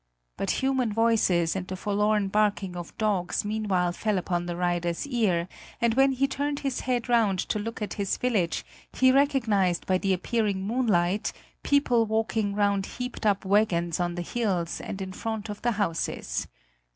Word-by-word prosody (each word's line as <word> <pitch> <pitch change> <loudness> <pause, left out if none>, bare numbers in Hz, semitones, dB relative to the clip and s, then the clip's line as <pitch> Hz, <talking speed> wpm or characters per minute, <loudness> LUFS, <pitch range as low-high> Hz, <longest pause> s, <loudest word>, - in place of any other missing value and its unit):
But - - -3 0.2
human 260 -4 +1
voices 205 -7 +2
and 185 -1 -3
the 185 - -4
forlorn 210 +1 +1
barking 205 -3 +1
of 175 -1 -8
dogs 205 -3 0
meanwhile 205 -5 0
fell 210 +3 -1
upon 175 -1 -1
the 175 - -3
rider's 175 +1 -1
ear, 210 -11 +1 0.3
and 235 -1 +2
when 270 +2 +4
he 270 +2 +1
turned 285 +1 -2
his 270 -3 -2
head 245 -2 -1
round 225 -6 +3
to 210 - 0
look 225 +1 -4
at 210 - -4
his 195 - 0
village, 210 -9 0 0.3
he 260 0 +5
recognised 235 - +2
by 185 -1 +2
the 195 - 0
appearing 195 0 -1
moonlight 210 -4 +1 0.3
people 245 -5 +3
working 220 -2 0
round 200 -1 +1
heaped 250 -3 -3
up 200 -1 +1
wagons 180 -5 +2
on 175 -1 -1
the 175 - -3
hills 185 -5 -1
and 195 0 -5
in 190 0 -7
front 220 0 -4
of 205 - -6
the 240 0 +1
houses. 165 - -2
205 Hz, 170 wpm, -27 LUFS, 180-230 Hz, 0.3 s, he